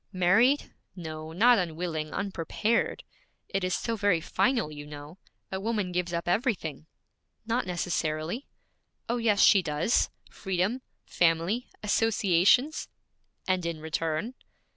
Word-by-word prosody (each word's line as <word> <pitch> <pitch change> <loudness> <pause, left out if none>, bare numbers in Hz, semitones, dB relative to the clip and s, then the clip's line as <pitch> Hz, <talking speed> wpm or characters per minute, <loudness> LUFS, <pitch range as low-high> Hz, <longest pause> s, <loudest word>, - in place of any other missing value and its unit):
'Married? 215 +10 +3 0.2
No, 160 -3 -7
not 230 +7 +5
unwilling; 165 -2 -3
unprepared. 200 +4 -1 0.5
It 195 -1 -1
is 185 -1 +1
so 230 - -2
very 205 -5 +2
final, 230 - 0
you 145 -1 -8
know. 150 +4 -10 0.3
A 190 - -2
woman 210 -3 -1
gives 180 -1 -1
up 170 0 -3
everything.' 175 - -1 0.6
'Not 230 -1 -1
necessarily.' 175 - -2 0.6
'Oh, 240 - 0
yes 220 -4 +2
she 200 - +7
does: 155 +6 +1 0.2
freedom, 190 +6 -1 0.2
family, 175 +8 +1 0.2
associations.' 210 - +3 0.6
'And 185 -1 +1
in 170 -2 -3
return?' 160 +7 -2
180 Hz, 120 wpm, -28 LUFS, 165-225 Hz, 0.6 s, she